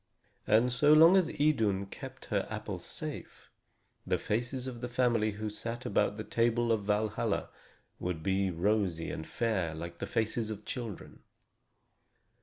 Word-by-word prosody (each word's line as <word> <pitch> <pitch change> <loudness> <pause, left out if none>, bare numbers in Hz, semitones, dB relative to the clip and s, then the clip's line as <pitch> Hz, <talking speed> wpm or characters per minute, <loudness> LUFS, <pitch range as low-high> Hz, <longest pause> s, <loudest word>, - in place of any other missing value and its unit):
And 115 +4 +4
so 145 +4 +5
long 165 +4 +8
as 185 -4 +4
Idun 115 -12 +1
kept 100 - -9
her - - +1
apples - - -5
safe, - - -7 0.5
the - - +1
faces 120 +4 -2
of 125 -3 -6
the 125 - -2
family 120 -4 +1
who 110 +1 -4
sat 115 +4 -5
about 105 -2 +1
the 110 - -4
table 115 +2 +1
of 110 -3 +1
Valhalla 105 +1 0 0.5
would 90 -3 -3
be 95 +1 +1
rosy 90 -1 0
and 80 - -6
fair 95 -4 -1
like 85 +1 -7
the - - -3
faces 115 -1 -1
of 105 -1 -6
children. 115 -7 -6
110 Hz, 150 wpm, -31 LUFS, 100-120 Hz, 0.5 s, long